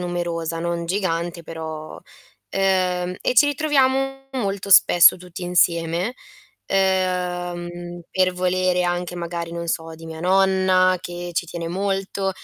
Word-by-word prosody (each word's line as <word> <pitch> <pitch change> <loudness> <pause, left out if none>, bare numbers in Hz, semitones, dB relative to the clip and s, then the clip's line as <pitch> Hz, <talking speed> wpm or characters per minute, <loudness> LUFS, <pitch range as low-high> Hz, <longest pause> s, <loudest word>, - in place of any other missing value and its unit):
numerosa, 170 -2 -3
non 170 0 -3
gigante 170 -2 -2
però 160 -1 -7
uhm, - - -15 1.1
e - - 0
ci 250 - +6
ritroviamo 270 -2 +1
molto 200 -6 -3
spesso 175 -1 +7
tutti 180 0 -9
insieme, 175 +3 +1 0.5
ehm, 180 -2 -1
per 185 -1 +1
volere 180 0 +1
anche 175 0 -2
magari, 170 -1 -4
non 170 0 -5
so, 165 0 -3
di 165 0 -11
mia 160 0 -8
nonna 185 0 +3
che 175 0 -6
ci 175 - 0
tiene 170 0 -6
molto, 195 +2 -2
180 Hz, 125 wpm, -22 LUFS, 170-190 Hz, 1.1 s, spesso